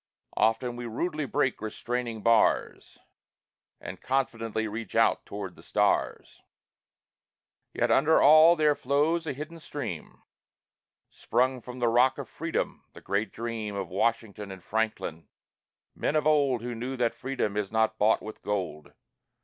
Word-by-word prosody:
Often 115 +3 +1
we 120 0 -5
rudely 150 +5 -2
break 135 -5 0
restraining 115 0 -4
bars, 115 -1 +2 0.8
And - - -8
confidently 115 -4 -1
reach 110 +2 -6
out - - +2
toward 100 -3 -6
the - - -15
stars. - - 0 1.3
Yet - - 0
under 150 +4 +4
all 155 +3 +7
there 155 -2 +3
flows 150 +5 0
a - - -1
hidden 155 +5 -8
stream 145 - -7 0.9
Sprung 130 +1 0
from 125 +2 -9
the 120 -1 +1
Rock 125 +3 +4
of 140 - -6
Freedom, 165 +1 -3
the - - -13
great 100 +1 -1
dream 115 -3 -4
Of 100 -1 -4
Washington 105 +1 -1
and 95 -2 -10
Franklin, 105 -7 -2 0.7
men 150 - -2
of 150 -1 +1
old 140 -6 +2
Who 120 0 -4
knew 125 +3 -5
that 120 -2 +1
freedom 125 -4 -3
is 105 -2 -2
not 110 0 +1
bought 110 +2 +3
with 110 - -9
gold. 95 -7 -4
120 Hz, 140 wpm, -28 LUFS, 110-140 Hz, 1.3 s, all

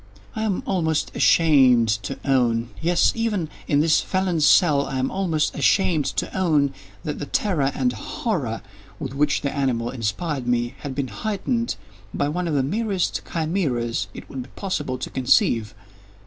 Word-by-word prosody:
I 220 - -3
am 215 -4 -1
almost 160 -4 0
ashamed 130 -8 +5
to 90 - -5
own—yes, 130 +6 +2
even 210 -8 -1 0.2
in 145 0 +3
this 160 0 +4
felon's 180 -5 +1
cell, 150 -7 +4
I 135 - -3
am 130 +1 0
almost 165 -6 0
ashamed 170 -7 +2
to - - -2
own—that 140 - -1
the 145 - -5
terror 155 -10 +1
and 250 - +1
horror 220 - -3 0.3
with 135 -3 -5
which 145 +1 +1
the 140 - -2
animal 125 -4 0
inspired 130 - -3
me, 120 0 0
had 140 -3 -6
been 140 -3 -2
heightened 220 - -2 0.4
by 145 - 0
one 175 +3 -2
of 155 - -1
the 135 - +2
merest 195 +4 -1
chimaeras 145 - -1
it - - -9
would 135 - -6
be 125 - -10
possible 150 -10 -3
to - - -6
conceive. 125 -5 +2
145 Hz, 155 wpm, -23 LUFS, 130-180 Hz, 0.4 s, ashamed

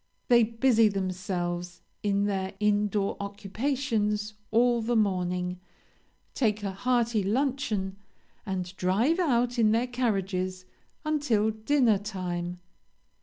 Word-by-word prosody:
They 240 -1 +7
busy 230 0 +3
themselves, 180 -3 -3 0.2
in 200 -1 +1
their 195 -2 -2
in 210 0 +2
door 200 -1 -1
occupations 210 +1 -2 0.2
all 240 +1 +3
the 235 +2 0
morning, 180 -3 0 0.7
take 215 -5 0
a 200 - -1
hearty 235 +1 +1
luncheon, 215 -3 -1 0.5
and 185 -2 -4
drive 225 - +2
out 245 -7 +1
in 215 -1 +4
their 230 +2 +2
carriages 195 -7 -1 0.4
until 280 -9 +1
dinner 220 -1 +2
time. 180 -4 -4
210 Hz, 110 wpm, -28 LUFS, 190-235 Hz, 0.7 s, They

